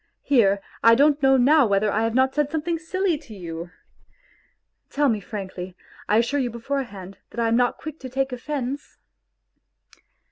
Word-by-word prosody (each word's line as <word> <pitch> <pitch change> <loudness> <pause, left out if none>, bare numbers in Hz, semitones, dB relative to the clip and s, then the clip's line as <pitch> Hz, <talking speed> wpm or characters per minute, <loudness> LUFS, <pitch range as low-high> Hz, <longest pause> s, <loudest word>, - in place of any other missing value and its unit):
Here, 200 -8 +3 0.2
I 230 0 +7
don't 290 +3 +3
know 270 -1 +5
now 275 +1 +5
whether 200 +1 +2
I 215 - 0
have 225 0 0
not 260 +1 +3
said 295 -1 0
something 320 +2 -2
silly 355 0 -1
to 225 -8 -13
you! 170 -2 -7 1.2
Tell 290 0 +2
me 220 -3 0
frankly; 190 -3 -7 0.3
I 210 - +4
assure 240 +5 +1
you 250 -3 0
beforehand 230 -6 -5
that - - -8
I 230 - +2
am 225 - +2
not 245 0 +2
quick 310 0 -8
to 260 - -8
take 270 +1 -1
offence 270 +2 -5
250 Hz, 170 wpm, -23 LUFS, 215-285 Hz, 1.2 s, I